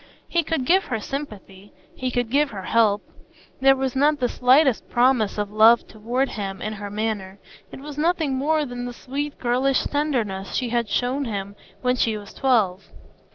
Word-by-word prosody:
He 340 - +1
could 320 -5 -2
give 380 +7 +3
her 225 -3 -2
sympathy; 205 -7 -8 0.2
he 255 - -2
could 245 -2 -2
give 290 +2 +3
her 195 -5 -7
help. 210 -1 +2 0.6
There 270 +1 +5
was 265 -1 -2
not 295 +3 +3
the 245 - +1
slightest 260 +1 +3
promise 240 -4 +2
of 205 -1 -2
love 220 +2 +6
toward 240 +5 -2
him 195 -3 -5
in 215 - -4
her 205 -1 -7
manner; 205 -2 -3 0.3
it - - -10
was 295 0 -8
nothing 320 -3 +1
more 300 +3 +1
than 245 -1 -6
the 245 - -6
sweet 280 +4 -5
girlish 255 +2 +1
tenderness 230 -11 -2
she 250 -2 -1
had 235 -2 -1
shown 255 +6 0
him 200 -3 -5 0.3
when 250 0 +2
she 225 -3 +1
was 205 -1 -11
twelve. 210 -8 +1
245 Hz, 180 wpm, -23 LUFS, 210-275 Hz, 0.6 s, love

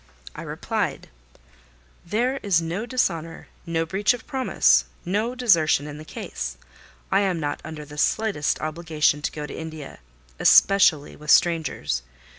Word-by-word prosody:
I - - -7
replied— - - -3 0.9
"There 240 +9 0
is 190 -5 +2
no 170 +8 -4
dishonour, 165 -10 -2 0.2
no 165 -1 0
breach 195 +7 +1
of 240 - -13
promise, 265 -3 +3 0.2
no 215 +7 -1
desertion 170 - +3
in 150 0 -8
the - - -9
case. - - -6 0.5
I 195 - +4
am 190 -4 0
not 145 -2 -3
under 155 -1 -8
the 150 0 -9
slightest 205 -9 0
obligation 155 -2 0
to - - -2
go 150 -1 -6
to - - -8
India, 160 -3 -8 0.4
especially 185 -7 +5
with 150 0 -11
strangers. 160 - +2
165 Hz, 140 wpm, -24 LUFS, 150-200 Hz, 0.9 s, especially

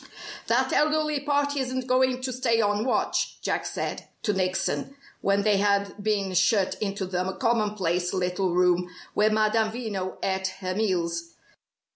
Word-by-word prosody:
"That - - +2
elderly 305 0 +2
party 285 0 0
isn't 260 -1 -2
going 255 0 +2
to 255 -1 -2
stay 235 -2 +1
on 205 0 +1
watch," 260 - 0
Jack - - -1
said - - -4 0.2
to 210 - +1
Nickson, 190 +8 -1 0.3
when 200 0 +2
they 210 -1 +3
had 200 0 +1
been 200 -3 0
shut 190 +2 +3
into 195 -2 -2
the 185 +1 -2
commonplace 200 -7 0
little 180 0 0
room 180 0 +3 0.2
where 210 +1 +3
Madame 215 0 +2
Veno 210 -6 -4
ate 190 0 0
her 185 -1 -2
meals. 170 -5 -1
205 Hz, 145 wpm, -26 LUFS, 185-240 Hz, 0.3 s, they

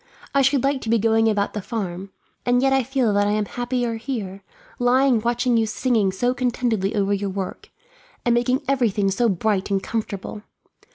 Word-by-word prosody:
I 275 - +4
should 270 -1 +2
like 275 -1 +1
to 225 - -5
be 230 - +4
going 225 +1 +3
about 205 -2 0
the 210 - -3
farm, 195 -3 -5 0.3
and 245 +1 +2
yet 270 0 +3
I 270 - +4
feel 255 -3 0
that 205 0 +2
I 205 - +1
am 210 0 0
happier 245 0 -2
here, 215 -6 -5 0.4
lying 250 -1 +3
watching 240 +1 +1
you 225 -1 +2
singing 215 -3 +1
so 245 +6 0
contentedly 240 -5 -1
over 200 -1 +1
your 200 0 -1
work, 190 -1 -5 0.6
and 240 - +3
making 250 +3 +1
everything 220 -7 +1
so 230 +4 +2
bright 195 +1 0
and 195 -1 0
comfortable. 210 -2 -4
225 Hz, 185 wpm, -22 LUFS, 205-245 Hz, 0.6 s, I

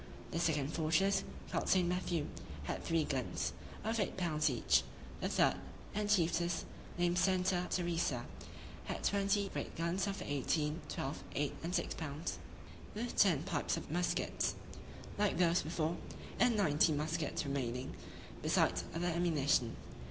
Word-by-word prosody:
The 165 - -1
second 150 -5 +1
fortress, 165 +5 +2 0.3
called - - 0
St. 185 -2 +4
Matthew, 175 -3 0 0.4
had - - -3
three 165 -1 +2
guns, 130 -4 -1 0.3
of 225 +1 0
eight 200 - -1
pounds 155 -4 +2
each. 115 - +3 0.4
The - - -1
third, - - +3 0.4
and 210 0 -1
chiefest, 170 -3 +2 0.3
named 175 0 +2
Santa 180 0 +2
Teresa, 170 -8 0 0.6
had - - -4
twenty 200 0 +2
great - - -4
guns, 170 +4 0
of 195 0 -2
eighteen, 150 +3 0
twelve, 135 +1 -3
eight, 145 0 0
and 175 +3 -2
six 170 - 0
pounds; 155 0 -4 0.6
with 235 +3 -3
ten 170 -8 +5
pipes 170 -5 0
of - - -6
muskets, 175 +2 0 0.6
like 205 -4 +2
those 175 0 +4
before, 160 +1 -1 0.4
and 240 -2 +4
ninety 155 -4 +4
muskets 155 +1 -1
remaining, 130 -2 -2 0.5
besides - - +2
other 170 +1 -1
ammunition. 155 -8 +2
170 Hz, 135 wpm, -35 LUFS, 150-185 Hz, 0.6 s, ten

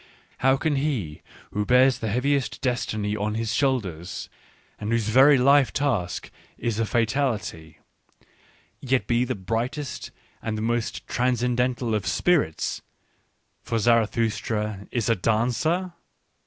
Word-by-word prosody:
how 135 +1 +4
can 150 0 0
he 125 - -2 0.3
who 105 - -1
bears 125 +4 +4
the 110 - -3
heaviest 135 +4 0
destiny 110 -5 -1
on 105 +1 -2
his 110 0 -2
shoulders 95 - -1 0.5
and 105 +2 -3
whose 115 -2 +1
very 135 +5 +7
life 140 +1 +5
task 120 -12 -1 0.3
is 115 -2 -2
a 115 - +1
fatality, 115 - -1 1.0
yet 130 -1 0
be 120 0 +2
the 125 +1 -2
brightest 115 +8 -3 0.3
and 110 -1 -3
the - - -3
most 120 0 -2
transcen 125 0 0
dental 125 -1 0
of 105 -4 -1
spirits 140 - +1 0.4
— - - -46
for 115 - -1
Zarathustra 110 -2 0
is 120 -3 -1
a 115 - +3
dancer? 125 - 0
120 Hz, 130 wpm, -25 LUFS, 105-130 Hz, 1.0 s, very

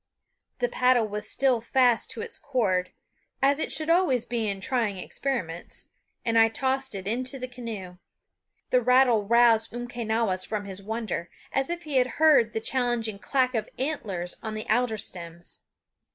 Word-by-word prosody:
The - - +1
paddle 250 - +3
was 210 0 -3
still 260 -4 +2
fast 245 0 +3
to - - -4
its 460 0 -7
cord 195 -9 0 0.5
as 280 +2 +3
it - - -2
should 310 - +1
always 335 -9 +3
be 230 -2 -1
in 195 -1 -3
trying 215 -1 -1
experiments 180 -5 -4 0.4
and 230 -1 +3
I 225 - +7
tossed 265 0 -1
it 190 0 -5
into 255 +5 -1
the 255 -1 -5
canoe. 220 -8 -7 0.7
The 250 - +4
rattle 250 -3 +4
roused 230 0 +4
Umquenawis 230 -5 -1
from 210 0 -3
his 195 0 -7
wonder, 215 -5 -4 0.2
as 270 +2 +1
if 345 0 -4
he 295 -4 -1
had 255 0 +1
heard 285 -8 +5
the - - -1
challenging 240 -4 -1
clack 255 +2 +1
of 220 -2 -2
antlers 205 - -2
on 220 -1 -5
the 215 - -5
alder 235 -1 +2
stems. 170 -3 -5
235 Hz, 165 wpm, -27 LUFS, 210-260 Hz, 0.7 s, I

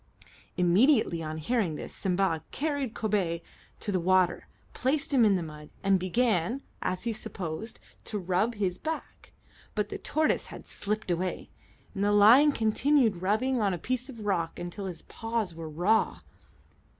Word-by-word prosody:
Immediately 185 - +4
on 155 0 -4
hearing 180 -1 0
this, - - -7
Simba 180 -4 0
carried 285 -5 -2
Kobay 190 -6 -1 0.4
to 205 - -2
the 185 - +1
water, 185 +1 +2 0.3
placed 285 +3 +1
him 255 -4 +5
in 205 -3 +5
the 180 - -1
mud, 150 -1 -10
and 195 -1 +4
began, 220 +4 +1 0.2
as 185 0 -2
he 235 -1 -1
supposed, 200 0 -6 0.3
to 210 - -3
rub 190 +5 0
his 185 -3 -1
back; 320 0 -6 0.4
but 210 -1 -1
the - - -5
tortoise 310 +1 0
had - - -10
slipped 210 -2 -3
away, 180 +1 -2 0.4
and 200 -1 -2
the 205 - +3
lion 230 +9 +7
continued 225 -3 +2
rubbing 230 +6 +1
on 195 -3 +2
a - - -5
piece 255 - -3
of 230 -5 -8
rock 175 -5 -1
until 175 +3 -5
his 175 -3 -7
paws 225 -5 -3
were 165 -1 -7
raw. 180 +9 +1
205 Hz, 160 wpm, -29 LUFS, 175-235 Hz, 0.4 s, lion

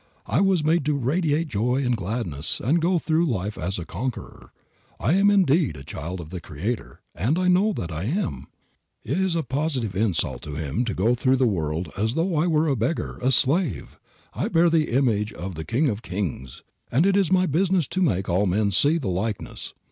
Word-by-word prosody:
I - - +1
was 190 -5 +2
made 160 +1 +2
to 150 -1 +1
radiate 155 +4 0
joy 125 +3 0
and 125 -1 +2
gladness 95 - -2
and 145 +9 +2
to - - -1
go 180 -1 +3
through 165 +1 +1
life 105 -5 -2
as 90 +4 -3
a 85 - -5
conqueror. 125 +9 -6
If - - -37
I 135 - +4
am 195 +2 +4
indeed 170 - +3
a 70 - -9
child 85 +6 -6
of 80 -1 -9
the 90 -2 -6
Creator 95 +11 -5
(and 120 - 0
I 185 0 +1
know 185 +4 +4
that 85 - -5
I 80 +4 -4
am), 175 - -2 0.6
it - - -1
is 190 -3 +1
a 165 - 0
positive 130 - -2
insult 100 -4 0
to 75 -1 -7
Him 80 - -2
to 110 - -3
go 110 +7 +2
through 130 +2 +2
the 130 - +3
world 80 -5 -1
as 110 +5 -1
though 170 +2 0
I 155 +3 +2
were 160 -1 +2
a 140 - +2
beggar, 125 +8 -2
a 130 +2 +2
slave. 135 - +2 0.3
I - - -2
bear 165 +1 +3
the 160 -2 +2
image 115 -5 +1
of 95 +2 -6
the 80 -1 -6
King 125 - +1
of 110 -4 -2
kings, 90 - -5 0.3
and 140 +9 +3
it 195 0 +3
is 195 -3 +2
my 185 0 +4
business 180 0 +1
to 190 - -1
make 95 - +1
all 95 +3 +1
men 100 +3 +1
see 145 - +4
the 145 - -4
likeness. 95 +3 -4
125 Hz, 215 wpm, -24 LUFS, -, 0.6 s, I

